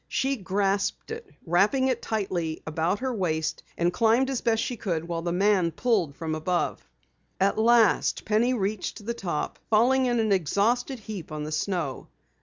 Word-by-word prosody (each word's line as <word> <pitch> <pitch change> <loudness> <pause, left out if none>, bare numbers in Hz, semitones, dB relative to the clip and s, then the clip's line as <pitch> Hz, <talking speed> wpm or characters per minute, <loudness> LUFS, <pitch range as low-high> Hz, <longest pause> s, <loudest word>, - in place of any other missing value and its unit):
She 270 +1 0
grasped 200 - -1
it, 455 -2 -7 0.2
wrapping 205 +10 +3
it 245 -2 -1
tightly 180 -7 -2
about 160 +4 0
her 260 -1 -1
wrist, 160 -7 -1 0.2
and 175 +1 +1
climbed 235 +4 +3
as 260 - -2
best 225 -1 +1
she 245 - -3
could 170 -7 -3
while 170 -1 -2
the 170 0 -2
man 190 -1 +3
pulled 180 - 0
from 160 -1 -4
above. 175 +3 -1 0.6
At 195 +3 +2
last 230 -1 +3
Penny 230 +4 +2
reached 205 0 -3
the 235 - -1
top, 175 -9 -3
falling 255 +4 +4
in 240 -1 +1
an 220 -2 +1
exhausted 210 - +1
heap 205 -7 -8
on 150 -1 -4
the 155 - -5
snow. 155 -4 -2
200 Hz, 170 wpm, -26 LUFS, 170-235 Hz, 0.6 s, falling